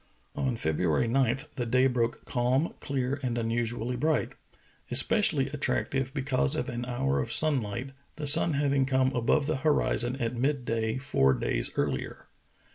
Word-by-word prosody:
On 130 Hz, -3 st, -1 dB
February 80 Hz, +4 st, 0 dB
9 130 Hz, 0 st, +1 dB, 0.2 s
the 120 Hz, -, -2 dB
day 130 Hz, +3 st, +3 dB
broke 120 Hz, -3 st, -1 dB
calm, 125 Hz, +5 st, 0 dB
clear, 135 Hz, 0 st, -2 dB
and 120 Hz, -3 st, -2 dB
unusu 115 Hz, 0 st, -2 dB
ally 125 Hz, +2 st, -3 dB
bright; 155 Hz, +5 st, 0 dB, 0.6 s
especially 140 Hz, -, +3 dB
attractive 135 Hz, -2 st, -2 dB
because 140 Hz, 0 st, 0 dB
of 140 Hz, -3 st, -3 dB
an 120 Hz, 0 st, -4 dB
hour 70 Hz, -, -1 dB
of 65 Hz, -, -3 dB
sunlight, 130 Hz, -4 st, +2 dB, 0.2 s
the 155 Hz, -, -5 dB
sun 160 Hz, +3 st, +5 dB
having 140 Hz, -1 st, +1 dB
come 130 Hz, -1 st, +2 dB
above 125 Hz, +5 st, +1 dB
the 155 Hz, -1 st, -1 dB
horizon 130 Hz, -4 st, 0 dB
at 120 Hz, -2 st, -3 dB
mid 135 Hz, +1 st, -1 dB
day 110 Hz, 0 st, -1 dB
four 100 Hz, -, +2 dB
days -, -, +1 dB
earlier. -, -, -3 dB
130 Hz, 155 wpm, -28 LUFS, 120-140 Hz, 0.6 s, sun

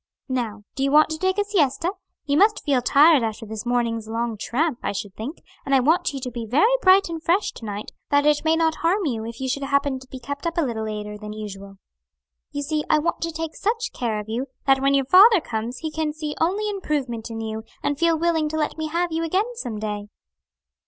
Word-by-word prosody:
Now, 230 Hz, -5 st, -2 dB
do 275 Hz, -, -5 dB
you 275 Hz, -, +2 dB
want 305 Hz, +1 st, +6 dB
to 315 Hz, -, -3 dB
take 375 Hz, +2 st, +1 dB
a 410 Hz, -, +3 dB
siesta? 345 Hz, -4 st, +1 dB, 0.3 s
you 285 Hz, -, +1 dB
must 415 Hz, +6 st, +4 dB
feel 275 Hz, -4 st, +2 dB
tired 290 Hz, +3 st, +6 dB
after 225 Hz, 0 st, -3 dB
this 220 Hz, +2 st, -6 dB
morning's 230 Hz, -2 st, 0 dB
long 230 Hz, 0 st, -2 dB
tramp, 255 Hz, +6 st, -1 dB
I 200 Hz, -, -2 dB
should 200 Hz, -1 st, -5 dB
think, 235 Hz, -, -7 dB, 0.2 s
and 275 Hz, -, +1 dB
I -, -, +6 dB
want 320 Hz, +7 st, +2 dB
you 275 Hz, -, -5 dB
to 250 Hz, -, -4 dB
be 235 Hz, -1 st, -5 dB
very 310 Hz, -, +4 dB
bright 380 Hz, -1 st, +6 dB
and 330 Hz, -1 st, -5 dB
fresh 355 Hz, +5 st, +1 dB
to 225 Hz, -, -10 dB
night, 205 Hz, 0 st, -5 dB, 0.2 s
that 285 Hz, 0 st, +3 dB
it 300 Hz, 0 st, +3 dB
may 320 Hz, 0 st, +3 dB
not 325 Hz, -1 st, +1 dB
harm 370 Hz, +4 st, +1 dB
you 230 Hz, -6 st, -2 dB
if 230 Hz, -, -8 dB
you 265 Hz, -, -2 dB
should 275 Hz, +2 st, -1 dB
happen 280 Hz, -1 st, 0 dB
to 260 Hz, -, -15 dB
be 260 Hz, -, -8 dB
kept 285 Hz, +6 st, -5 dB
up 335 Hz, -, -3 dB
a -, -, +4 dB
little 225 Hz, -3 st, -3 dB
later 210 Hz, -1 st, -5 dB
than 210 Hz, 0 st, -7 dB
usual. 200 Hz, -2 st, -8 dB, 0.7 s
You 285 Hz, -1 st, -3 dB
see 300 Hz, +1 st, -1 dB
I 310 Hz, -, +5 dB
want 330 Hz, +3 st, -1 dB
to 335 Hz, -, -2 dB
take 325 Hz, 0 st, -4 dB
such 460 Hz, +3 st, -1 dB
care 230 Hz, -3 st, -2 dB
of 210 Hz, -, -7 dB
you, 240 Hz, +5 st, -3 dB, 0.2 s
that 270 Hz, -1 st, +4 dB
when 275 Hz, +1 st, +3 dB
your 275 Hz, -1 st, +2 dB
father 390 Hz, -, +7 dB
comes 235 Hz, -3 st, -4 dB
he 315 Hz, -, -2 dB
can 310 Hz, -1 st, -2 dB
see 305 Hz, -1 st, -4 dB
only 395 Hz, +6 st, +1 dB
improvement 285 Hz, -, -3 dB
in 225 Hz, -1 st, -5 dB
you, 220 Hz, 0 st, -4 dB, 0.2 s
and 290 Hz, 0 st, -1 dB
feel 335 Hz, -1 st, +3 dB
willing 320 Hz, -2 st, +1 dB
to 315 Hz, -, -3 dB
let 310 Hz, +1 st, -2 dB
me 315 Hz, -, -1 dB
have 340 Hz, +2 st, -1 dB
you 325 Hz, +1 st, -1 dB
again 390 Hz, +9 st, 0 dB
some 240 Hz, -, -5 dB
day." 210 Hz, -1 st, -4 dB
280 Hz, 240 wpm, -23 LUFS, 230-330 Hz, 0.7 s, father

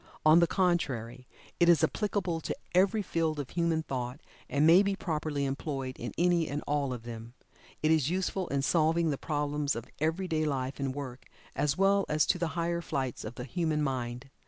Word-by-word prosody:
On 155 Hz, +2 st, +8 dB
the 170 Hz, -, +4 dB
contrary 130 Hz, -, -1 dB, 0.3 s
it 175 Hz, -, +5 dB
is 165 Hz, -1 st, +5 dB
applicable 180 Hz, -2 st, 0 dB
to -, -, -3 dB, 0.2 s
every 200 Hz, +4 st, +3 dB
field 160 Hz, -4 st, -1 dB
of 140 Hz, -, -5 dB
human 170 Hz, -2 st, +1 dB
thought, 125 Hz, -1 st, -4 dB, 0.3 s
and 145 Hz, +2 st, +2 dB
may 170 Hz, +4 st, +8 dB
be 200 Hz, -1 st, 0 dB
properly 150 Hz, -5 st, -2 dB
employed 135 Hz, -1 st, -3 dB
in 120 Hz, -, -4 dB
any 175 Hz, -2 st, +3 dB
and 145 Hz, +1 st, -3 dB
all 145 Hz, -2 st, 0 dB
of 120 Hz, -2 st, -5 dB
them. 115 Hz, 0 st, -8 dB, 0.5 s
It 155 Hz, -, +4 dB
is 155 Hz, -3 st, +3 dB
useful 185 Hz, 0 st, -1 dB
in 140 Hz, -1 st, -1 dB
solving 165 Hz, +1 st, +2 dB
the 140 Hz, -, -3 dB
problems 145 Hz, -1 st, -1 dB
of 115 Hz, 0 st, -5 dB
every 165 Hz, +5 st, 0 dB
day 155 Hz, -2 st, 0 dB
life 135 Hz, -3 st, -2 dB
and 135 Hz, -1 st, -2 dB
work, 130 Hz, -3 st, -7 dB, 0.3 s
as 145 Hz, +2 st, +1 dB
well 195 Hz, 0 st, +3 dB
as 150 Hz, 0 st, +3 dB
to 180 Hz, -, +1 dB
the 170 Hz, -, 0 dB
higher 170 Hz, 0 st, 0 dB
flights 135 Hz, -7 st, -3 dB
of 110 Hz, +3 st, -7 dB
the 125 Hz, -, -6 dB
human 155 Hz, +3 st, -1 dB
mind. 125 Hz, -1 st, -3 dB
155 Hz, 195 wpm, -30 LUFS, 135-170 Hz, 0.5 s, On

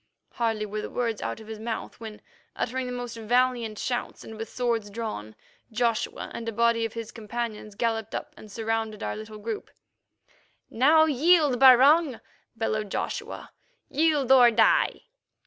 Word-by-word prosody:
Hardly 225 Hz, -2 st, -1 dB
were 210 Hz, +1 st, -4 dB
the -, -, -6 dB
words 230 Hz, -3 st, -2 dB
out -, -, -4 dB
of 220 Hz, -, -12 dB
his 220 Hz, 0 st, -8 dB
mouth 225 Hz, 0 st, -5 dB
when, 220 Hz, -2 st, -9 dB, 0.3 s
uttering 255 Hz, +1 st, -2 dB
the -, -, -4 dB
most 245 Hz, -1 st, -5 dB
valiant 240 Hz, -1 st, +1 dB
shouts 245 Hz, +2 st, -3 dB
and 220 Hz, -, -9 dB
with 225 Hz, +1 st, -6 dB
swords 230 Hz, -4 st, -1 dB
drawn, 200 Hz, -, -6 dB, 0.4 s
Joshua 230 Hz, 0 st, -1 dB
and 230 Hz, -1 st, -4 dB
a -, -, -3 dB
body 230 Hz, +1 st, +2 dB
of 225 Hz, -, -5 dB
his 230 Hz, -2 st, -6 dB
companions 220 Hz, -2 st, -5 dB
galloped 225 Hz, -1 st, -2 dB
up -, -, -5 dB
and 215 Hz, -, -13 dB
surrounded 225 Hz, 0 st, -3 dB
our -, -, -3 dB
little 215 Hz, 0 st, -9 dB
group. 215 Hz, +1 st, -5 dB, 1.0 s
"Now 305 Hz, +7 st, +5 dB
yield, 300 Hz, -2 st, +3 dB
Barung," 270 Hz, +2 st, +6 dB, 0.4 s
bellowed 215 Hz, -2 st, -2 dB
Joshua; -, -, -5 dB, 0.4 s
"yield 295 Hz, -4 st, +2 dB
or 250 Hz, -2 st, +8 dB
die!" -, -, +3 dB
230 Hz, 155 wpm, -26 LUFS, 220-250 Hz, 1.0 s, or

